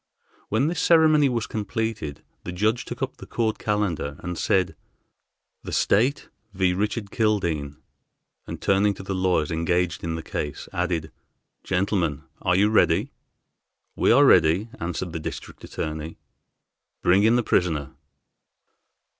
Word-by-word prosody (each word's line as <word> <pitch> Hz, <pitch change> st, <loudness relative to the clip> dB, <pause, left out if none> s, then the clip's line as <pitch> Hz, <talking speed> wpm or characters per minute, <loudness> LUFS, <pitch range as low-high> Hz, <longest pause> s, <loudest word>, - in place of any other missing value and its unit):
When 110 Hz, +6 st, +2 dB
this 165 Hz, +1 st, -1 dB
ceremony 155 Hz, -4 st, +5 dB
was 120 Hz, -3 st, -1 dB
completed, 110 Hz, -, -4 dB, 0.2 s
the 90 Hz, -, -5 dB
judge 110 Hz, +7 st, 0 dB
took 120 Hz, +2 st, -5 dB
up 135 Hz, -, -4 dB
the -, -, -11 dB
court 110 Hz, -2 st, -1 dB
calender 100 Hz, -9 st, -1 dB
and 90 Hz, 0 st, -4 dB
said, 95 Hz, +2 st, +1 dB, 0.9 s
"The -, -, -7 dB
State 125 Hz, +8 st, +2 dB, 0.3 s
v. 90 Hz, -1 st, +2 dB
Richard 105 Hz, +2 st, -2 dB
Kildene," 85 Hz, -10 st, 0 dB, 0.7 s
and -, -, -6 dB
turning 100 Hz, +1 st, +2 dB
to -, -, -9 dB
the 95 Hz, -, -3 dB
lawyers 90 Hz, -5 st, +1 dB
engaged 85 Hz, +1 st, 0 dB
in 85 Hz, -1 st, -2 dB
the 80 Hz, -, -5 dB
case 75 Hz, -2 st, -5 dB
added, 85 Hz, -3 st, -2 dB, 0.5 s
"Gentlemen, 90 Hz, -6 st, 0 dB, 0.2 s
are 90 Hz, -1 st, +2 dB
you 105 Hz, +3 st, +3 dB
ready?" 105 Hz, +4 st, +3 dB, 0.8 s
"We -, -, +3 dB
are 145 Hz, -, +6 dB
ready," 90 Hz, -, +4 dB
answered 85 Hz, +1 st, -3 dB
the 80 Hz, -, -3 dB
District -, -, -7 dB
Attorney. 80 Hz, +1 st, -5 dB, 0.9 s
"Bring 95 Hz, +3 st, +5 dB
in 110 Hz, +3 st, +4 dB
the 120 Hz, -, +2 dB
prisoner." 80 Hz, -9 st, 0 dB
95 Hz, 140 wpm, -24 LUFS, 85-110 Hz, 0.9 s, are